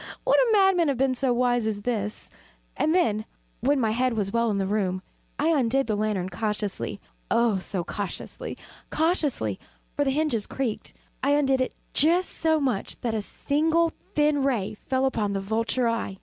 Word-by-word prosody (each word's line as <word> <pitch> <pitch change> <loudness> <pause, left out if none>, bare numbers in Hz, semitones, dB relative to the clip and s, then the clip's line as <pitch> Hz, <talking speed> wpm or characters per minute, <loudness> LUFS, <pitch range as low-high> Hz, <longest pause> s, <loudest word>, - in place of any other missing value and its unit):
would - - +4
a - - +4
madman 385 -5 +4
have 275 -3 +1
been 265 0 +2
so 255 0 +1
wise 245 -2 +2
as 205 -2 -3
this, 210 -3 -3 0.4
And 315 +3 +1
then, 215 - +2 0.4
when 280 +4 +2
my 225 -3 +1
head 250 +2 +1
was 205 -3 -1
well 235 0 +2
in 205 - 0
the 195 - 0
room, 190 -2 -1 0.3
I 305 +3 +2
undid 270 -3 +2
the 215 - 0
lantern 205 -3 -1
cautiously 210 0 -3 0.3
oh, 230 -4 +3
so 185 -1 -3
cautiously 200 +2 -5 0.3
cautiously 295 - 0 0.4
(for 290 - +2
the 275 - +1
hinges 270 -6 0
creaked) 250 -5 -4 0.3
I 280 +2 +3
undid 270 -3 +2
it 255 - -2 0.2
just 345 +5 +3
so 320 -1 +1
much 255 -8 -2
that 235 -2 -1
a 220 - 0
single 320 +9 +1 0.2
thin 295 -1 +3
ray 240 -8 0
fell 260 +5 -1
upon 215 -6 0
the 195 - -1
vulture 225 +5 0
eye. 230 -4 -2
245 Hz, 180 wpm, -26 LUFS, 210-285 Hz, 0.4 s, would